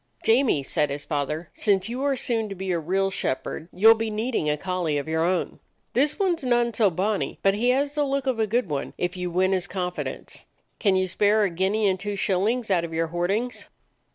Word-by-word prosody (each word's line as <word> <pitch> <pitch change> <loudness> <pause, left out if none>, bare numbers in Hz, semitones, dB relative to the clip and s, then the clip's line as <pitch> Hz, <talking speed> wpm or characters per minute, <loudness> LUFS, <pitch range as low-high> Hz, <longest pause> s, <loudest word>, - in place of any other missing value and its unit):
"Jamie," 225 - +3
said 150 +2 0
his 145 +1 -5
father, 150 +2 -3
"since 200 -2 +1
you 245 +3 -4
are 280 -1 +1
soon 225 -4 -1
to 195 - -6
be 190 0 -3
a 170 - +1
real 195 +4 0
shepherd 160 0 -3
you 200 +5 +3
'll 225 - +11
be 225 0 -3
needing 215 -6 -1
a 150 - +1
collie 175 -3 -1
of 145 - -3
your 160 0 0
own. 180 +1 -1 0.3
This 290 +4 +2
one 380 -4 +2
's 325 - -7
none 240 -2 +2
so 215 -2 +3
bonny, 195 +4 -1
but 195 - +4
he 230 +5 +1
has 280 +3 +1
the 295 0 +1
look 275 -1 -1
of 255 -4 0
a 220 - +2
good 235 +1 0
one, 145 -3 -4
if 180 0 -2
you 180 -1 -3
win 185 +2 +2
his 185 -2 0
confidence. 180 -2 -5 0.3
Can 200 -3 +3
you 185 0 +1
spare 210 +3 +2
a 195 - +1
guinea 195 +5 +1
and 190 -1 +1
two 205 +1 -3
shillings 205 +4 0
out 175 -3 +3
of 165 -1 -5
your 165 0 0
hoardings?" 195 +9 -2
195 Hz, 230 wpm, -25 LUFS, 175-230 Hz, 0.3 s, ll